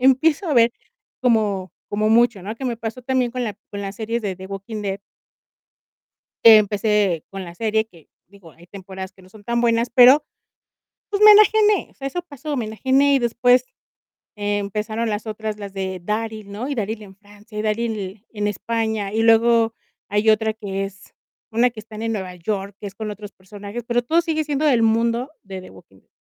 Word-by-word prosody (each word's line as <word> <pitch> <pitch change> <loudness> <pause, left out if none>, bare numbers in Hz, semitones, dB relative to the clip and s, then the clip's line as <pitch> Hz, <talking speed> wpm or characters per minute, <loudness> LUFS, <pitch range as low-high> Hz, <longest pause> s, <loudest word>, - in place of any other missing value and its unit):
empiezo 280 +7 +3
a 295 - +1
ver 235 0 +5 0.5
como 210 -6 +1 0.2
como 210 +1 0
mucho, 235 -3 +3
¿no?, 215 +4 -6
que 270 - -7
me 240 -2 -1
pasó 225 +2 -6
también 250 -1 0
con 250 0 -3
la 210 -3 -4
con 200 - -6
la 195 -1 -4
serie 225 +3 -3
de 200 -4 -3
The 190 +1 -10
Walking 200 +2 -6
Dead 195 0 -3 1.5
que 225 -1 +10
empecé 205 -4 +1
con 195 -1 -6
la 170 -1 -10
serie 220 +1 0
que, 170 -8 -21 0.2
digo, 195 -4 -17
hay 170 +3 -19
temporadas 190 0 -8
que 190 - -21
no 185 - -18
son 205 +1 -16
tan 235 +1 0
buenas, 230 0 +2
pero, 255 +5 +7 0.9
pues, 405 0 -2
me 425 - +11
enajené, 425 -1 +5
o - - -25
sea, 275 - -5
eso 355 +6 -3
pasó, 300 -3 -6
me 235 - -2
enajené, 265 +6 +2
y - - +3
después 245 +1 +3 0.7
empezaron 210 +2 -2
las 210 +1 -3
otras, 215 0 -4
las 200 -1 -7
de 190 -1 -4
Daryl, 215 0 -3
¿no? 215 +6 -5
Y 285 - -2
Daryl 220 -1 -3
en 195 -2 -13
Francia, 210 +2 -12
y - - 0
Daryl 225 +2 0
l 195 +3 -8
en 210 -1 -1
España, 220 -1 -2
y 225 - +1
luego 230 0 +4 0.4
hay 210 +2 +2
otra 220 0 +3
que 195 -3 -4
es 195 0 -13 0.4
una 240 +3 +3
que 230 - -11
están 215 0 -10
en 225 0 -1
Nueva 190 -3 -4
York, 195 +2 -4
que 205 - -6
es 195 - -11
con 215 0 -5
otros 205 0 -9
personajes, 205 +4 -9
pero, 240 0 +1
todo 325 +7 +2
sigue 320 -2 -1
siendo 295 0 -1
del 245 -6 +4
mundo 230 +3 +1
de 190 -1 -8
The 185 - -12
Walking 95 - -18
Dead - - -37
220 Hz, 205 wpm, -21 LUFS, 200-235 Hz, 1.5 s, me